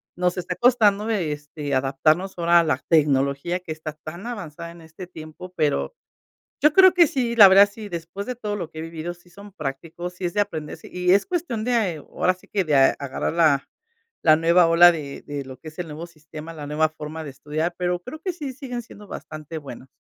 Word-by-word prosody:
nos 180 +1 0
está 180 0 -3
costando 215 -4 +3
de, 190 -9 0
este, 145 -1 -5
adaptarnos 155 +8 +1
ahora 170 0 +5
a - - +4
la 155 -5 +1
tecnología 145 +2 +2
que 180 -3 -9
está 155 -1 -6
tan 160 +5 -9
avanzada 170 -7 -7
en 170 0 -14
este 160 +3 -10
tiempo. 170 +2 -11
Pero 150 - 0 0.7
yo 300 - +6
creo 375 -1 +8
que 345 -3 +6
sí, 245 -4 -1
la 205 -4 +10
verdad, 195 +2 +7
sí, 210 0 -9
después 170 +3 -6
de 250 - -4
todo 210 -3 -4
lo 170 -5 -5
que 160 - -11
he - - -5
vivido, 165 +1 -6
sí 175 0 -23
son 200 +2 -13
prácticos, 165 +3 -6
sí 180 0 -8
es 175 - -4
de 205 - +2
aprender, 155 -7 -3
sí, - - -13
y 180 0 +2
es 200 - +4
cuestión 330 - -2
de, 225 -8 +1
ahora 180 +4 -1
sí 185 - -21
que, 195 -2 0
de 155 -3 0
agarrar 135 0 +1
la 155 -4 +3 0.5
la 155 - +6
nueva 170 +2 +4
ola 175 +1 +8
de 145 -4 -7
de 145 -1 -6
lo 130 0 -10
que 155 - -10
es 155 - -13
el 175 - -3
nuevo 155 +2 -7
sistema, 155 0 -10
la 150 -2 -7
nueva 155 +2 +1
forma 155 +1 -7
de 145 - -6
estudiar, 155 +5 -3
pero 180 0 -1
creo 310 - -8
que 370 +2 -3
sí 295 -6 -6
siguen 250 -2 -6
siendo 210 -2 -14
bastante 155 +1 -7
buenas. 135 -3 -10
170 Hz, 220 wpm, -23 LUFS, 155-200 Hz, 0.7 s, la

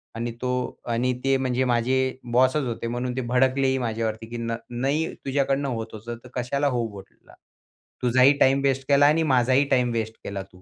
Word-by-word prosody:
आणि 120 +1 -3
तो 125 0 -1 0.4
आणि 125 +2 +1
ते 135 0 +3
म्हणजे 130 -1 0
माझे 120 +1 +1 0.4
बॉसच 130 +4 +3
होते, 115 0 -4
म्हणून 125 +1 -3
ते - - 0
भडकलेही 130 +2 +2
माझ्यावरती. 115 -2 -3
"की 120 - -6
न 115 0 -2
नाही 135 +6 -1
तुझ्याकडनं 140 0 0
होत 115 -2 -3
होतं, 115 +2 -7
तर 125 - -13
कशाला 140 +4 0
हो 120 -4 0
बोला? 100 -2 -14 0.7
तुझाही 130 +3 +5
टाईम 135 +1 +4
वेस्ट 135 -1 0
केला 140 0 +5
आणि 160 +2 +3
माझाही 130 +3 +3
टाईम 125 -3 +2
वेस्ट 110 -1 -3
केला 100 -1 -5
तू." 90 -1 -20
125 Hz, 180 wpm, -24 LUFS, 115-135 Hz, 0.7 s, तुझाही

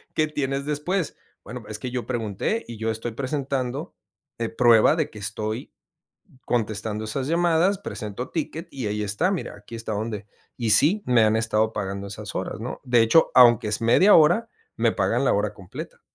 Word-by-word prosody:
que 155 - +2
tienes 140 -2 -2
después". 150 +4 -2 0.3
"Bueno, 125 -1 -8
es 105 0 -5
que 125 - -4
yo 125 -1 -3
pregunté 120 - -2
y 115 - -8
yo 110 +1 -1
estoy 115 +2 -5
presentando, 135 0 -3 0.4
eh 115 -1 -1
prueba 120 +3 +5
de 155 -3 -1
que - - -13
estoy 110 +5 -4 0.7
contestando 110 -2 -2
esas 130 +5 -3
llamadas, 175 +3 +2
presento 110 - -6
ticket 165 +1 -4
y 130 -5 -5
ahí 105 +1 -2
está, 105 - 0
mira, 190 - -4
aquí 105 +3 -13
está 115 -1 -5
donde 105 -1 -4 0.3
y 115 -3 -1
sí 165 - +5
me 125 -2 +4
han 110 0 +3
estado 110 0 +1
pagando 100 -1 -4
esas 105 +1 -8
horas, 95 - -4
¿no? 120 +3 -6
De 125 -2 +3
hecho, 115 +9 +4
aunque 120 -3 +6
es 105 +1 0
media 150 - +5
hora, 170 +9 +5 0.3
me - - +2
pagan - - 0
la - - +3
hora - - -1
completa". - - -9
120 Hz, 180 wpm, -24 LUFS, 110-150 Hz, 0.7 s, aunque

